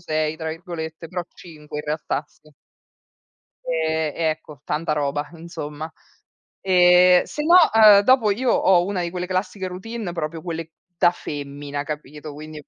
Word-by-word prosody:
"6" 155 Hz, -2 st, -1 dB
tra 160 Hz, 0 st, -5 dB
virgolette, 165 Hz, -1 st, -7 dB
però 180 Hz, 0 st, -3 dB
5 150 Hz, -3 st, -10 dB
in 150 Hz, -, -6 dB
realtà, 150 Hz, -1 st, -2 dB
sì. 150 Hz, +1 st, -24 dB, 1.1 s
Ehm, 160 Hz, -2 st, -1 dB
ecco, 155 Hz, -3 st, -3 dB
tanta 155 Hz, +1 st, -1 dB
roba 145 Hz, 0 st, -2 dB
insomma. 160 Hz, -2 st, -7 dB, 0.7 s
Ehm, 180 Hz, -1 st, +6 dB
se 300 Hz, -, -5 dB
no, 335 Hz, +3 st, +4 dB, 0.2 s
uhm, 215 Hz, -2 st, +8 dB
dopo 230 Hz, 0 st, +4 dB
io 240 Hz, +5 st, 0 dB
ho 175 Hz, -2 st, +4 dB
una 195 Hz, -2 st, -2 dB
di 170 Hz, -, -3 dB
quelle 180 Hz, 0 st, -4 dB
classiche 185 Hz, +1 st, -3 dB
routine 195 Hz, +2 st, -6 dB
proprio 165 Hz, -1 st, -4 dB
quelle 165 Hz, -2 st, -5 dB, 0.3 s
da 175 Hz, -, +4 dB
femmina 145 Hz, -3 st, -6 dB
capito, 150 Hz, 0 st, -7 dB
quindi 155 Hz, 0 st, -10 dB
165 Hz, 145 wpm, -22 LUFS, 150-180 Hz, 1.1 s, uhm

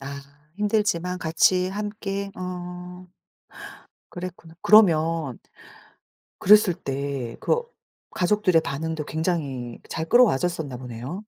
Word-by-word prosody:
아 140 Hz, +1 st, -7 dB, 0.4 s
힘들지만 205 Hz, -4 st, 0 dB
같이 180 Hz, +2 st, +2 dB
함께 200 Hz, 0 st, -4 dB
어. 180 Hz, 0 st, -7 dB, 1.0 s
그랬구나. 175 Hz, -2 st, -8 dB
그러면 165 Hz, -, +4 dB, 1.0 s
그랬을 210 Hz, -2 st, +6 dB
때 135 Hz, -5 st, -4 dB
그 475 Hz, -, +1 dB, 0.5 s
가족들의 185 Hz, -2 st, +2 dB
반응도 160 Hz, +2 st, -4 dB
굉장히 145 Hz, -8 st, -3 dB
잘 160 Hz, -, -3 dB
끌어와졌었나 170 Hz, -, +2 dB
보네요. 125 Hz, -, -7 dB
175 Hz, 220 characters per minute, -24 LUFS, 145-190 Hz, 1.0 s, 그랬을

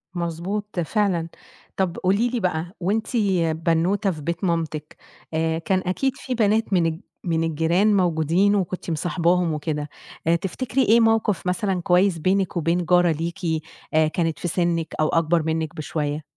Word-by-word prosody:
مضبوط، 175 Hz, +4 st, -3 dB
فعلًا. 175 Hz, -2 st, 0 dB, 0.5 s
طب 185 Hz, -3 st, 0 dB
قُولي 200 Hz, +6 st, +2 dB
لي 245 Hz, -1 st, -2 dB
بقى، 175 Hz, -1 st, -2 dB
وأنتِ 205 Hz, +5 st, 0 dB, 0.6 s
بنوتة 185 Hz, +5 st, +2 dB
في 155 Hz, -3 st, -7 dB
بيت 170 Hz, +5 st, -3 dB
مامتِك، 160 Hz, -3 st, -2 dB, 0.4 s
آآ 160 Hz, 0 st, 0 dB
كان 185 Hz, +2 st, 0 dB
أكيد 260 Hz, +9 st, 0 dB
في 255 Hz, -2 st, -4 dB
بنات 215 Hz, -1 st, +2 dB
من 175 Hz, -3 st, +3 dB
الج 165 Hz, 0 st, -2 dB, 0.2 s
من 165 Hz, -2 st, 0 dB
الجيران 170 Hz, +6 st, +2 dB
موجودين، 175 Hz, +3 st, +2 dB
وكنتِ 185 Hz, -2 st, -2 dB
مصاحباهم 170 Hz, +1 st, +1 dB
وكده. 150 Hz, -1 st, -3 dB, 0.4 s
آآ 170 Hz, -, +5 dB
تفتكري 250 Hz, +9 st, -2 dB
إيه 230 Hz, +2 st, +5 dB
موقف 225 Hz, -4 st, +2 dB
مثلًا 185 Hz, -1 st, 0 dB
كويس 180 Hz, 0 st, +3 dB
بينِك 185 Hz, +1 st, 0 dB
وبين 170 Hz, +2 st, +1 dB
جارة 175 Hz, 0 st, +4 dB
ليكِ، 165 Hz, 0 st, -2 dB, 0.3 s
آآ 155 Hz, 0 st, +4 dB
كانت 165 Hz, -1 st, -1 dB
في 175 Hz, -, -3 dB
سنِك 170 Hz, -1 st, -1 dB
أو 155 Hz, -, +3 dB
أكبر 165 Hz, 0 st, +2 dB
منِك 160 Hz, -1 st, -2 dB
بشوية؟ 150 Hz, -1 st, -3 dB
175 Hz, 155 wpm, -23 LUFS, 160-195 Hz, 0.6 s, آآ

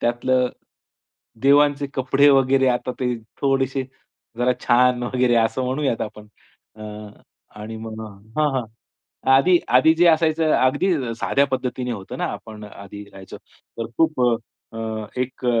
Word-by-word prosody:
त्यातलं 125 Hz, +1 st, +1 dB, 0.9 s
देवांचे 145 Hz, +1 st, +4 dB
कपडे 135 Hz, +2 st, +3 dB
वगैरे 135 Hz, 0 st, +3 dB
आता 125 Hz, 0 st, -1 dB
ते 125 Hz, -1 st, 0 dB, 0.3 s
थोडेसे 135 Hz, -1 st, 0 dB, 0.6 s
जरा 125 Hz, +1 st, +2 dB
छान 125 Hz, 0 st, +3 dB
वगैरे 125 Hz, 0 st, +1 dB
असं 115 Hz, +3 st, +1 dB
म्हणूयात 130 Hz, -1 st, -1 dB
आपण. 105 Hz, -1 st, -8 dB, 0.5 s
अ, 110 Hz, -, -11 dB, 0.8 s
आणि 110 Hz, +1 st, -7 dB
मग 110 Hz, 0 st, -8 dB, 0.4 s
हां, 150 Hz, -1 st, +3 dB
हां. 130 Hz, -2 st, -1 dB, 0.7 s
आधी, 175 Hz, +7 st, +5 dB
आधी 130 Hz, +6 st, +5 dB
जे 175 Hz, +2 st, +4 dB
असायचं, 160 Hz, -1 st, +3 dB
अगदी 145 Hz, +9 st, +2 dB, 0.3 s
साध्या 140 Hz, +1 st, +2 dB
पद्धतीने 125 Hz, -2 st, -3 dB
होतं 100 Hz, -5 st, -7 dB
ना, -, -, -1 dB
आपण 110 Hz, -1 st, -10 dB
आधी 100 Hz, 0 st, -11 dB
राहायचो. 95 Hz, -1 st, -11 dB
तर 115 Hz, -, -11 dB
खूप 160 Hz, -5 st, +2 dB
अ, 120 Hz, -1 st, +3 dB, 0.4 s
अ, 110 Hz, -1 st, -4 dB, 0.2 s
एक 130 Hz, 0 st, -5 dB
130 Hz, 135 wpm, -22 LUFS, 115-140 Hz, 0.9 s, आधी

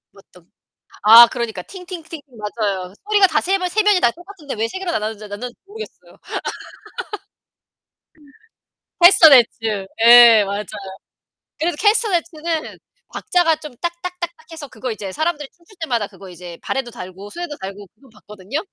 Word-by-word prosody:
어떤 180 Hz, -3 st, -21 dB, 0.5 s
아, 230 Hz, +3 st, +10 dB
그러니까. 235 Hz, -2 st, -5 dB
팅팅팅 350 Hz, -4 st, -10 dB
맞아요. 210 Hz, -6 st, -4 dB, 0.2 s
소리가 410 Hz, -2 st, +5 dB
다 315 Hz, -4 st, 0 dB
3 385 Hz, +2 st, 0 dB
명 365 Hz, -1 st, -2 dB
3 430 Hz, +5 st, +1 dB
명이 410 Hz, -3 st, +3 dB
다 240 Hz, -, +4 dB
똑같은데 350 Hz, -, -10 dB
왜 225 Hz, 0 st, -1 dB
3 375 Hz, -, -6 dB
개로 375 Hz, -2 st, -4 dB
나눠지 215 Hz, -6 st, -3 dB
나누는지 240 Hz, +4 st, -7 dB
모르겠어요. 440 Hz, +2 st, -12 dB, 2.8 s
캐스터네츠. 240 Hz, -, +5 dB, 0.2 s
예, 235 Hz, -2 st, +9 dB
맞아요. 200 Hz, +1 st, -4 dB, 0.9 s
그래서 330 Hz, +1 st, -1 dB
캐스터네츠는 340 Hz, -7 st, 0 dB, 0.4 s
박자가 350 Hz, -3 st, +1 dB
좀 300 Hz, -3 st, -11 dB
딱딱딱딱 345 Hz, 0 st, -4 dB, 0.2 s
해서 320 Hz, -3 st, -8 dB
그거 255 Hz, -2 st, -6 dB
이제 200 Hz, -3 st, -6 dB
사람들이 310 Hz, -, -2 dB
춤출 350 Hz, +4 st, -22 dB
때마다 235 Hz, -10 st, -1 dB
그거 195 Hz, -2 st, -14 dB
이제 175 Hz, -1 st, -11 dB
발에도 265 Hz, -3 st, -3 dB
달고 190 Hz, -2 st, -10 dB
손에도 345 Hz, +2 st, -6 dB
달고 195 Hz, +1 st, -8 dB
그거 265 Hz, +4 st, -22 dB
봤거든요. 210 Hz, +5 st, -7 dB
270 Hz, 325 characters per minute, -19 LUFS, 210-345 Hz, 2.8 s, 아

